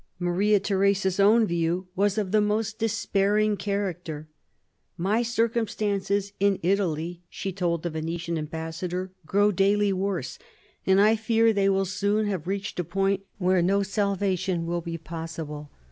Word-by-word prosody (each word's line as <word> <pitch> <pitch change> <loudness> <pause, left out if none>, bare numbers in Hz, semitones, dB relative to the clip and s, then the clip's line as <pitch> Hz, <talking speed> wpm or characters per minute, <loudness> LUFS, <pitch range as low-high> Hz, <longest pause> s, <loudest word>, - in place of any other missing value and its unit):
Maria 190 +4 +2
Theresa's 195 -1 +1
own 220 +3 +5
view 170 0 -1
was 200 +1 +1
of 200 -4 -1
the 215 0 +4
most 215 +1 -1
despairing 210 -1 +1
character. 180 -7 -3 0.7
"My 200 +6 +1
circumstances 215 -4 0
in 200 -1 +3
Italy," 175 -2 0
she 195 - -5
told 170 -3 -1
the 175 - -2
Venetian 165 +2 -3
ambassador, 165 +4 -4 0.2
"grow 205 +4 +3
daily 200 +1 +2
worse; 185 -8 -3 0.5
and 190 0 +5
I 215 +2 +5
fear 225 +1 +2
that - - +3
they 200 -1 +2
will 195 0 +2
soon 205 +3 0
have 185 -5 -3
reached 200 0 -3
a - - +1
point 195 +3 0 0.2
where 185 -2 +2
no 195 +3 +2
salvation 195 -3 -1
will 170 +1 -2
be 165 0 -5
possible. 160 -2 -7
195 Hz, 145 wpm, -26 LUFS, 175-205 Hz, 0.7 s, own